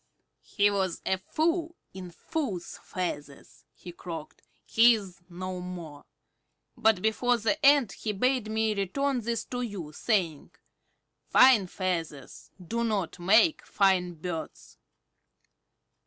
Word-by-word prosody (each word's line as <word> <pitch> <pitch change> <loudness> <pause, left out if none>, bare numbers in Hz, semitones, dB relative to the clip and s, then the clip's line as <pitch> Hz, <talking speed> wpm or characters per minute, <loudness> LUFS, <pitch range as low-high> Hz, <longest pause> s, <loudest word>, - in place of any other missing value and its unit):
"He 205 0 +1
was 190 -3 -1
a 190 - 0
fool 330 - -1 0.2
in 185 -2 -8
fools' 210 - -5
feathers," 145 -6 -6
he 175 - -10
croaked. 170 -2 -8 0.2
"He 235 +1 +6
is 190 -4 -9
no 185 +1 -5
more. 170 -5 -8 0.7
But 220 -4 +2
before 245 +3 +2
the 265 +8 -1
end 275 -6 +5
he 215 - -4
bade 250 +2 0
me 220 0 0
return 250 +7 -1
these 230 +1 -3
to 245 0 -2
you, 195 -10 -6
saying, 175 -10 -1 0.8
'Fine 250 -7 +6
feathers 165 -7 -4
do 230 +7 -3
not 200 -6 -2
make 220 - +4
fine 185 -3 +1
birds.'" 165 0 -7
195 Hz, 120 wpm, -28 LUFS, 180-235 Hz, 0.8 s, He